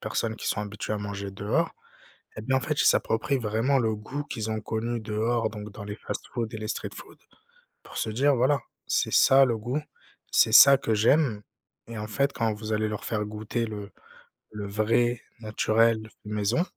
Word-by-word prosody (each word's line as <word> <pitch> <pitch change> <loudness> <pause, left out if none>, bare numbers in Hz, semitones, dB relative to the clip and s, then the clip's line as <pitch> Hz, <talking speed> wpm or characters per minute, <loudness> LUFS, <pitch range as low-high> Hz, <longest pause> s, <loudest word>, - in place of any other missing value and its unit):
personnes 110 -1 -2
qui - - -7
sont 105 - -1
habituées 105 +1 -5
à - - -3
manger 100 -1 -5
dehors, 105 +12 0 0.7
eh - - -5
bien 130 - +1
en - - +2
fait 150 +1 -1
ils - - +3
s'approprient 135 +5 +2
vraiment 115 +4 +1
le 110 -3 +1
goût 135 +7 -5
qu'ils 110 -5 -4
ont 110 0 -2
connu 115 +2 -2
dehors, 110 +2 0
donc 105 -1 -8
dans 105 - -9
les 105 0 -5
fast-foods 115 0 -5
et 110 - -4
les 110 - -5
street - - -4
foods, - - -12 0.6
pour - - -13
se - - -1
dire: 140 +6 +3
«Voilà, 135 +4 +2 0.3
c'est - - 0
ça 135 0 +6
le 115 -3 -1
goût. 125 +7 -2 0.5
C'est - - +4
ça 140 -1 +9
que 115 -5 0
j'aime» 115 0 +3 0.5
et 115 -1 -6
en 105 - -4
fait 140 +5 0
quand 115 -2 0
vous 110 +1 -5
allez 110 0 +1
leur 105 0 -5
faire 105 -2 -1
goûter 110 +2 -3
le 105 -2 -7 0.6
le 105 -1 -5
vrai, 115 +4 +1 0.2
naturel, 110 0 +1 0.2
maison, 105 +8 0
110 Hz, 195 wpm, -27 LUFS, 105-120 Hz, 0.7 s, ça